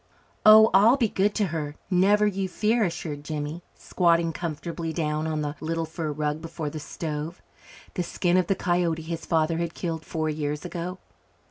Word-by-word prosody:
"Oh, 220 +1 +9
I'll 215 +7 +6
be 235 -4 +2
good 200 +2 +1
to 210 - +2
her, 150 -2 -3 0.2
never 200 +3 +4
you 195 -2 -1
fear," 220 +4 +1
assured 160 -5 -3
Jimmy, 150 +2 -4
squatting 170 -2 +1
comfortably 165 0 -4
down 155 -1 -1
on 155 -1 -1
the 145 0 -2
little 165 +1 -2
fur 160 -1 -4
rug 150 +1 -2
before 165 -2 -5
the 155 - -5
stove 155 +2 -5 0.5
the - - -1
skin 175 0 0
of 180 -2 +2
the 195 - +2
coyote 175 -3 0
his 165 0 -5
father 165 0 +1
had 170 -1 -3
killed 165 -3 -3
four 155 -1 -2
years 150 +1 -3
ago. 180 +1 -5
165 Hz, 175 wpm, -26 LUFS, 155-180 Hz, 0.5 s, Oh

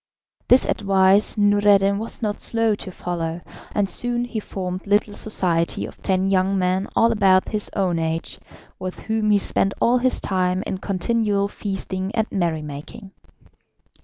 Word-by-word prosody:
This 250 - +5
advice 195 +1 +3
Noureddin 205 -1 +4
was 225 +1 -4
not 210 -1 -2
slow 225 -1 +2
to 205 -2 -6
follow, 170 -1 -4 0.3
and 205 -1 0
soon 240 +4 0
he 240 -2 -4
formed 185 -2 -6
little 205 +1 +2
society 175 -6 0
of - - -12
ten 190 -1 0
young 195 0 +1
men 185 +1 0
all 230 0 +4
about 195 -4 +3
his 210 -2 -2
own 180 -4 0
age, 160 0 -3 0.4
with 185 0 -5
whom 220 -1 -1
he 205 - +5
spent 195 0 0
all 245 +2 +3
his 255 +1 +1
time 185 0 -1
in 190 - -4
continual 200 +1 0
feasting 195 -1 -4
and 220 -2 +1
merry 170 -5 -1
making. 150 +7 -9
195 Hz, 155 wpm, -22 LUFS, 185-210 Hz, 0.4 s, This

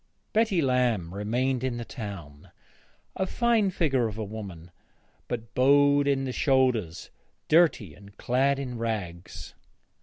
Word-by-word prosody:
Betty 215 -7 +2
Lamb 120 -10 +1
remained 120 +6 -1
in 130 -2 -2
the 120 - -5
town, 95 - -9 0.7
a 190 - -1
fine 230 -2 +2
figure 135 -10 +1
of 105 -1 -7
a 110 - -3
woman, 100 -5 -8 0.6
but 115 -1 -5
bowed 145 +2 +4
in 135 -1 +1
the 130 - -3
shoulders, 125 - 0 0.4
dirty, 155 - +3
and 100 +2 -17
clad 135 +3 +1
in 125 -4 -5
rags. 90 -7 -5
125 Hz, 130 wpm, -27 LUFS, 105-140 Hz, 0.7 s, bowed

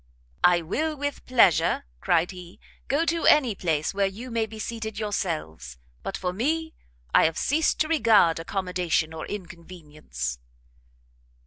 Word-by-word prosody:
"I 175 -1 +5
will 310 - -2
with 285 0 -4
pleasure," 230 -9 +3
cried 170 - +1
he, 180 -1 -12 0.3
"go 290 +5 +1
to 335 0 0
any 265 -7 +5
place 160 -5 -1
where 200 0 +1
you 230 +6 -8
may 225 -1 0
be 220 +1 -10
seated 220 0 -5
yourselves; 155 - -4 0.2
but 195 - -4
for 180 -1 -3
me, 320 - -1 0.4
I - - +6
have 160 0 0
ceased 310 +3 +1
to 310 - +2
regard 225 - +4
accommodation 180 -2 -1
or 160 - -6
inconvenience." 155 - -7
195 Hz, 140 wpm, -25 LUFS, 165-240 Hz, 0.4 s, I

